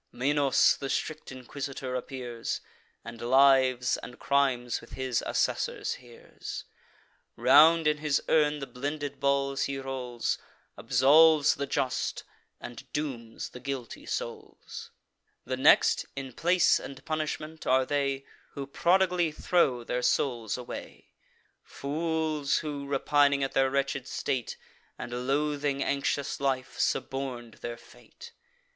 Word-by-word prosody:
Minos, 140 +1 +3
the 135 - -5
strict 155 +1 -3
inquisitor, 130 +1 -6
appears; 125 -2 -4 0.5
And 115 - -9
lives 130 0 +4
and 125 - -10
crimes, 130 -4 +1
with 115 - -15
his 130 -3 -1
assessors, - - -1
hears. 120 -2 -9 0.7
Round 150 +7 +6
in 150 0 +2
his 150 -1 +1
urn 150 -1 +3
the 140 - -5
blended 140 +1 -5
balls 140 0 +1
he 140 0 -3
rolls, 130 -3 -3 0.4
Absolves 155 +2 +5
the 140 - -4
just, 130 -1 -1 0.4
and 120 - -10
dooms 130 -7 -4
the 125 - -10
guilty 130 -3 -6
souls. - - -6 0.6
The 130 +2 -2
next, 130 +3 +4
in 135 -2 -6
place 175 +4 +3
and 135 -1 -10
punishment, 155 0 -4
are 130 0 +4
they 140 -1 -1 0.3
Who 140 - -5
prodigally 175 +3 +2
throw 150 -6 +1
their 125 +1 -2
souls 120 -4 0
away; 125 -1 -9 0.5
Fools, 155 0 -1
who, 145 -3 -4
repining 140 0 +3
at 135 - -1
their 135 0 +2
wretched 135 -1 -1
state, 125 -3 -3 0.4
And 120 +1 -5
loathing 145 0 0
anxious 140 0 -1
life, 135 -2 -2
suborn'd 125 -4 -2
their 120 0 -5
fate. 470 - -15
140 Hz, 120 wpm, -28 LUFS, 130-150 Hz, 0.7 s, Round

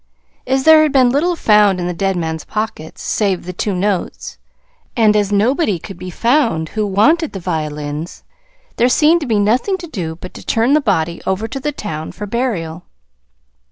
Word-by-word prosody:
As 265 0 +1
there 315 +1 +7
had 310 -1 +2
been 260 -3 +4
little 340 +6 +1
found 210 - +4
in 175 - -2
the 180 - -2
dead 195 +2 -1
man's 160 -2 -3
pockets, 215 -7 -5
save 195 -5 -1
the 180 - -6
two 195 +2 -2
notes, 195 0 -3 0.6
and 215 -2 +4
as 205 -1 +1
nobody 215 - +2
could 185 +2 -10
be 185 - -6
found 230 - +1
who 215 -1 -2
wanted 295 - +2
the 195 - -5
violins, 155 -2 -4 0.5
there 240 +2 +3
seemed 315 +6 +4
to 290 - -4
be 220 -3 +1
nothing 240 - +1
to 350 - -8
do 175 - -5
but 180 +2 -10
to - - -11
turn 235 +4 +1
the 305 - +4
body 170 - -1
over 190 +4 -1
to 270 - -5
the 295 +3 -2
town 160 - -6
for 210 - -6
burial. 195 -8 -3
210 Hz, 190 wpm, -17 LUFS, 175-255 Hz, 0.6 s, there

